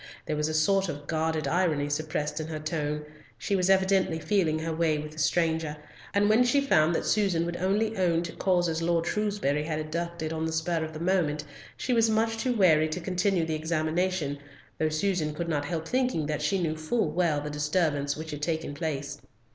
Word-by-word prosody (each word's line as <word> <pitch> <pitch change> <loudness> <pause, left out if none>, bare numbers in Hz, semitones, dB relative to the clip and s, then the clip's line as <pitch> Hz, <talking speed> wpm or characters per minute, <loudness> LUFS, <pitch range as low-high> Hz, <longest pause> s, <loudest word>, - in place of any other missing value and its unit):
There 155 - -2
was 150 +1 0
a - - -2
sort 195 +4 +2
of 145 -2 -6
guarded 160 0 -1
irony 160 -5 +1
suppressed 150 +1 -2
in 155 - -4
her 160 -1 -4
tone—she 155 +3 -4
was 185 -1 +1
evidently 190 -3 +3
feeling 165 -2 +1
her 160 +1 -3
way 160 -1 +1
with 150 0 -6
the 155 - -10
stranger, 160 -1 +1 0.3
and 200 0 +3
when 220 +4 +5
she 245 +3 +3
found 170 - +3
that - - -1
Susan 195 -6 +2
would 170 0 -3
only 210 +4 0
own 175 -3 +2
to 170 - -5
causes 175 -3 +1
Lord 165 0 +1
Shrewsbury 205 -9 0
had 155 -1 -2
adduced 165 +1 -3
on 160 0 -1
the - - -2
spur 160 +1 0
of 160 0 -6
the 155 - -6
moment, 165 -4 +1 0.3
she 255 - -1
was 230 -1 +4
much 225 +1 +1
too 250 +2 0
wary 155 -6 +4
to 155 - -3
continue 180 0 0
the 160 - -2
examination, 160 -1 -1 0.4
though 155 - +2
Susan 155 -2 0
could 170 +2 -3
not 145 -3 -1
help 165 0 -3
thinking 250 - 0
that 150 0 -2
she 170 +6 +1
knew 160 -3 -1
full 155 +3 -1
well 165 -3 +1
the 150 +1 -5
disturbance 150 -1 0
which 160 0 -6
had 150 -1 -6
taken 160 -1 -2
place. 145 -2 -4
160 Hz, 205 wpm, -28 LUFS, 155-185 Hz, 0.4 s, when